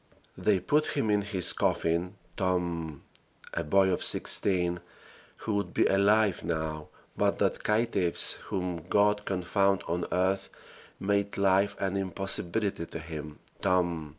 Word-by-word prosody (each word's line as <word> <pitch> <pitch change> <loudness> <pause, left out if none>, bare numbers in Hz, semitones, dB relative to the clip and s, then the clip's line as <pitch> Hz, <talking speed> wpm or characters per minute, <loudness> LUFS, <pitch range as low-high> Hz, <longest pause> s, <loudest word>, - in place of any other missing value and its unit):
They 100 -3 +1
put 150 +11 0
him 110 -6 +1
in 105 0 +2
his 95 -3 -1
coffin 85 +4 0 0.2
("TOMB!") 85 -5 -2 0.5
a 85 - -2
boy 95 +4 +3
of - - -1
sixteen, 90 -3 +3 0.6
who 110 - -4
would 100 0 -2
be - - +3
alive 100 0 +3
now 80 -2 -3 0.3
but - - +1
that - - 0
caitiffs, 105 -5 +2
whom 90 -3 -4
God 105 0 +2
confound 95 +1 +1
on 85 +1 -2
earth, 95 +2 0 0.5
made 100 0 -1
life 100 +1 +2
an 95 0 -2
impossibility 95 0 -2
to - - -7
him 80 -2 -8 0.2
("TOMB!") 85 -5 0
95 Hz, 130 wpm, -28 LUFS, 85-100 Hz, 0.6 s, boy